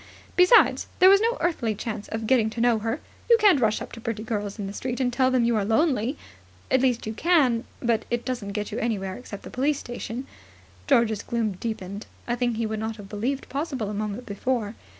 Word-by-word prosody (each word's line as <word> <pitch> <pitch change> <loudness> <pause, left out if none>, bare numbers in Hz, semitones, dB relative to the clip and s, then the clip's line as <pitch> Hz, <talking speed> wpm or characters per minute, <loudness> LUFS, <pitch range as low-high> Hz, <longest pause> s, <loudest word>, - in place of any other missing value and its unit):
Besides 360 +6 +5
there 370 +1 +8
was 395 +1 +6
no 465 +2 +1
earthly 235 -11 0
chance 210 -1 -5
of 225 0 -4
getting 225 -2 +3
to 225 - -7
know 235 -1 +3
her. 225 +6 -2 0.3
You 465 - +8
can't 405 -9 +6
rush 215 -2 +1
up - - -10
to 230 - -9
pretty 220 -1 -3
girls 205 -2 -3
in 205 - -4
the 195 - -5
street 250 +4 -4
and 250 -2 0
tell 260 +1 +3
them 255 -2 +2
you 235 0 +2
are 210 - +1
lonely. 250 +3 +1 0.5
At 260 - +4
least, 250 -3 +1
you 220 - -3
can, 260 -5 +3 0.2
but 230 -2 +1
it 240 0 -2
doesn't 235 -6 -3
get 210 0 -3
you 215 - -3
anywhere 195 -5 -2
except 215 -5 -9
the - - -9
police 280 +3 +1
station. 240 0 -6 0.6
George's 220 -3 +3
gloom 230 -3 -1
deepened 200 0 -5 0.2
a 240 - 0
thing 240 -1 0
he 230 +1 -1
would 220 0 -3
not 220 +1 -3
have 200 -2 -11
believed 245 +7 -2
possible 270 -7 -3
a - - -5
moment 210 +3 -4
before. 215 0 -2
230 Hz, 220 wpm, -25 LUFS, 215-260 Hz, 0.6 s, there